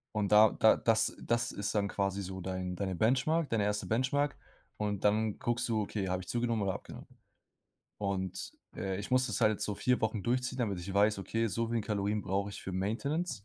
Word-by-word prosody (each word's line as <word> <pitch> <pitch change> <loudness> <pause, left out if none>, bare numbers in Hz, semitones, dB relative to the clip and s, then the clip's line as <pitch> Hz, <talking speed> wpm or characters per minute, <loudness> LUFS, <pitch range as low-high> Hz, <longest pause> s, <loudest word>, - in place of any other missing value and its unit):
Und 105 -2 0
da 105 0 +8
da 110 - +5
das 115 -1 +2
das 120 0 0
ist 100 +2 -3
dann 100 -1 +1
quasi 100 0 -1
so 95 0 -6
dein 90 0 -3
deine 95 0 -2
Benchmark 135 - +2
deine 115 -4 +1
erste 105 0 -1
Benchmark 140 +5 +1 0.4
und 105 -2 -2
dann 105 0 +2
guckst 120 +1 -1
du, 110 -2 +1
okay, 100 -1 -3
habe 95 0 -1
ich 90 - -13
zugenommen 120 -2 0
oder 95 -2 0
abgenommen. - - -9 0.9
Und, 95 -2 -3 0.2
äh, 95 -1 -2
ich 105 - -6
muss 130 0 +3
das 110 -2 -2
halt 110 -2 +3
so 105 - -1
4 125 +4 +1
Wochen 110 -2 -1
durchziehen, 125 +3 -1
damit 105 -7 -1
ich 90 +3 -6
weiß, 105 +1 +3
okay, 115 +4 -1
so 115 +3 -1
viele 115 0 0
Kalorien 105 0 -1
brauche 100 +1 -1
ich - - -8
für 95 - -5
Maintenance. 115 - -2
105 Hz, 205 wpm, -32 LUFS, 100-115 Hz, 0.9 s, da